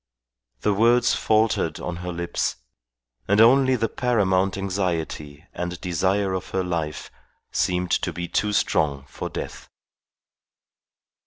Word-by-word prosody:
The 105 Hz, -, +2 dB
words 120 Hz, +4 st, +4 dB
faltered 110 Hz, 0 st, +1 dB
on 85 Hz, -1 st, -4 dB
her 90 Hz, +1 st, -5 dB
lips, 85 Hz, 0 st, -2 dB, 0.7 s
and 100 Hz, +2 st, +3 dB
only 130 Hz, +3 st, +6 dB
the 115 Hz, -2 st, 0 dB
paramount 100 Hz, -6 st, +1 dB
anxiety 85 Hz, -6 st, -3 dB
and 90 Hz, 0 st, -4 dB
desire 95 Hz, +2 st, 0 dB
of 95 Hz, -1 st, -4 dB
her 95 Hz, -, -1 dB
life 80 Hz, -6 st, -3 dB, 0.4 s
seemed 90 Hz, 0 st, 0 dB
to -, -, -1 dB
be 85 Hz, 0 st, -5 dB
too 105 Hz, +4 st, 0 dB
strong 70 Hz, -8 st, +1 dB
for -, -, -6 dB
death. -, -, -7 dB
95 Hz, 120 wpm, -24 LUFS, 85-105 Hz, 0.7 s, only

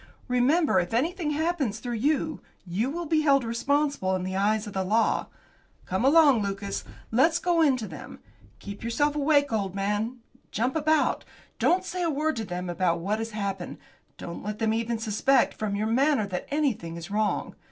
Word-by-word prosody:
Remember, 250 Hz, -, +3 dB
if 175 Hz, +5 st, -2 dB
anything 325 Hz, +5 st, 0 dB
happens 300 Hz, -7 st, -1 dB
through 240 Hz, +1 st, -5 dB
you, 295 Hz, +6 st, 0 dB, 0.2 s
you 195 Hz, +8 st, -1 dB
will 340 Hz, +4 st, -4 dB
be 310 Hz, 0 st, +2 dB
held 275 Hz, -3 st, +4 dB
responsible 235 Hz, -3 st, 0 dB
in 185 Hz, -, -3 dB
the 185 Hz, +1 st, -3 dB
eyes 210 Hz, +2 st, +1 dB
of 210 Hz, -, -8 dB
the 190 Hz, -, -1 dB
law. 220 Hz, +4 st, +1 dB, 0.6 s
Come 190 Hz, +5 st, -1 dB
along, 280 Hz, -4 st, +6 dB
Lucas, 200 Hz, 0 st, -3 dB, 0.3 s
let's 315 Hz, +9 st, +4 dB
go 345 Hz, -1 st, +1 dB
in 280 Hz, -5 st, +4 dB
to 220 Hz, -3 st, -5 dB
them. -, -, -9 dB, 0.4 s
Keep 200 Hz, +1 st, -9 dB
yourself 290 Hz, +6 st, 0 dB
awake, 285 Hz, -3 st, +2 dB
old 200 Hz, -3 st, -1 dB
man; 210 Hz, +5 st, -1 dB, 0.3 s
jump 245 Hz, +6 st, -1 dB
about. 310 Hz, 0 st, +2 dB, 0.4 s
Don't 370 Hz, +1 st, +2 dB
say 365 Hz, 0 st, -4 dB
a 340 Hz, -, +1 dB
word 310 Hz, +1 st, 0 dB
to 225 Hz, -, -3 dB
them 180 Hz, -1 st, -5 dB
about 175 Hz, 0 st, 0 dB
what 205 Hz, +5 st, -1 dB
has 225 Hz, 0 st, -3 dB
happened. 200 Hz, -4 st, -4 dB, 0.4 s
Don't 170 Hz, -, -7 dB
let 210 Hz, +1 st, -4 dB
them 220 Hz, -1 st, +1 dB
even 230 Hz, +1 st, -1 dB
suspect 225 Hz, +4 st, +2 dB
from 210 Hz, -2 st, -3 dB
your 210 Hz, +1 st, -1 dB
manner 260 Hz, +1 st, +2 dB
that 185 Hz, -2 st, -5 dB
anything 255 Hz, -, -1 dB
is 170 Hz, +3 st, -8 dB
wrong. 210 Hz, 0 st, -1 dB
230 Hz, 185 wpm, -26 LUFS, 200-295 Hz, 0.6 s, along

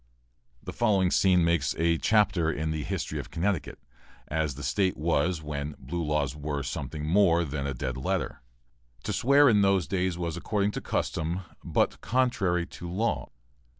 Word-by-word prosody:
The -, -, -6 dB
following 100 Hz, -6 st, +2 dB
scene 90 Hz, -3 st, +4 dB
makes 85 Hz, -5 st, +1 dB
a 85 Hz, 0 st, +2 dB
chapter 100 Hz, -7 st, +3 dB
in 80 Hz, +1 st, -2 dB
the 80 Hz, -1 st, -2 dB
history -, -, -3 dB
of -, -, -7 dB
Connecticut, 85 Hz, -3 st, -2 dB, 0.5 s
as 75 Hz, -3 st, -1 dB
the -, -, -8 dB
State 95 Hz, -3 st, +1 dB
was 80 Hz, +2 st, 0 dB
when 75 Hz, 0 st, -4 dB
"blue 80 Hz, +7 st, -4 dB
laws" 75 Hz, -3 st, 0 dB
were 75 Hz, -1 st, -3 dB
something 75 Hz, +4 st, -4 dB
more 85 Hz, 0 st, +4 dB
than 70 Hz, -1 st, -3 dB
a 70 Hz, -, -3 dB
dead 65 Hz, +1 st, -3 dB
letter. 65 Hz, -, -2 dB, 0.6 s
To -, -, -2 dB
swear 140 Hz, +3 st, +5 dB
in 105 Hz, -5 st, +5 dB
those 95 Hz, -5 st, +3 dB
days 90 Hz, +1 st, -1 dB
was 85 Hz, -2 st, -3 dB
according 100 Hz, +3 st, 0 dB
to -, -, -5 dB
custom, 85 Hz, +4 st, -2 dB, 0.2 s
but -, -, 0 dB
contrary 95 Hz, -9 st, +1 dB
to 90 Hz, -1 st, -9 dB
law. 105 Hz, +6 st, -1 dB
85 Hz, 165 wpm, -28 LUFS, 75-95 Hz, 0.6 s, swear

